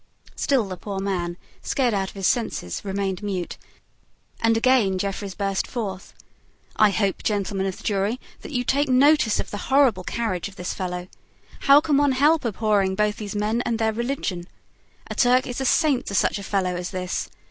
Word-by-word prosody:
Still 260 -7 +1
the 185 -1 -6
poor 200 +1 -6
man, 180 -3 -2 0.2
scared 250 -4 0
out 195 -1 -1
of - - -15
his 195 -1 -3
senses, 200 - -1
remained 195 -1 -2
mute; 190 -4 -4 0.8
and 225 0 +3
again 225 -6 +3
Jeffreys 195 0 -3
burst 195 0 -1
forth. 195 -6 -5 0.6
"I 215 - +5
hope, 200 -1 0
gentlemen 200 -2 -1
of 190 - -4
the - - -13
jury, 205 +3 0 0.2
that - - -9
you 245 -3 0
take 280 +3 +1
notice 270 -2 +4
of - - -4
the 205 - -4
horrible 265 -9 +4
carriage 205 -4 -2
of 200 - -13
this 180 - -4
fellow. 180 -1 -4 0.6
How 280 +1 +9
can 300 -3 +2
one 285 -1 +3
help 295 +4 +3
abhorring 205 -3 +1
both 210 +1 +1
these 210 -3 -6
men 215 +3 0
and 230 - -1
their 220 -1 +1
religion? 225 -7 -3 0.6
A - - -6
Turk 250 +1 +3
is 250 +1 -4
a - - -1
saint 275 -1 +2
to 200 - -3
such 200 - +2
a - - -7
fellow 185 -2 -1
as 175 0 -4
this. 185 -1 -3
210 Hz, 190 wpm, -24 LUFS, 190-245 Hz, 0.8 s, How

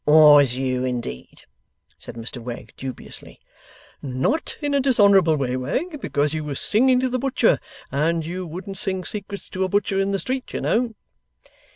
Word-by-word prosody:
'Was 150 -4 +7
you, 130 -1 -1
indeed?' 120 - -5 0.6
said - - -10
Mr 120 +2 -7
Wegg, 120 0 -8
dubiously. 130 -1 -8 0.6
'Not 135 - -1
in 290 -2 -2
a 280 - +3
dishonourable 200 - +5
way, 130 -3 -1
Wegg, 280 - -3
because 145 - 0
you 155 -1 -2
was 145 -3 -3
singing 250 +3 +4
to 260 - +1
the 255 +1 -1
butcher; 270 +1 +2 0.3
and 160 +3 0
you 180 +2 -5
wouldn't 190 +4 -7
sing 190 -2 -2
secrets 200 -1 -6
to 185 - -1
a 185 - -1
butcher 200 0 +1
in 195 0 +1
the 200 - 0
street, 260 +5 -4
you - - -3
know. 230 -1 0
175 Hz, 170 wpm, -23 LUFS, 135-215 Hz, 0.6 s, Was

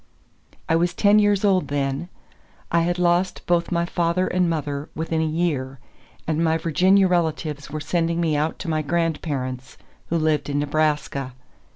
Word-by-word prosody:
I 160 - +2
was 175 +1 +1
ten 205 0 +5
years 205 -1 +2
old 190 -2 +2
then; 140 +3 -2 0.6
I 170 - +3
had 175 +1 0
lost 180 +1 +1
both 175 0 +1
my 170 -1 +1
father 170 +1 0
and 180 -1 +1
mother 145 -2 -3
within 160 0 -1
a - - +1
year, 155 -5 -1 0.5
and 160 +1 0
my 160 0 +2
Virginia 185 +5 +3
relatives 160 -5 -1
were 155 +1 -4
sending 170 +1 -1
me 160 -3 +1
out 150 +2 -1
to - - -5
my 155 -1 0
grandparents, 145 -5 -2 0.3
who 170 - 0
lived 155 -2 0
in 145 - -1
Nebraska. 145 -3 -1
165 Hz, 165 wpm, -23 LUFS, 150-175 Hz, 0.6 s, ten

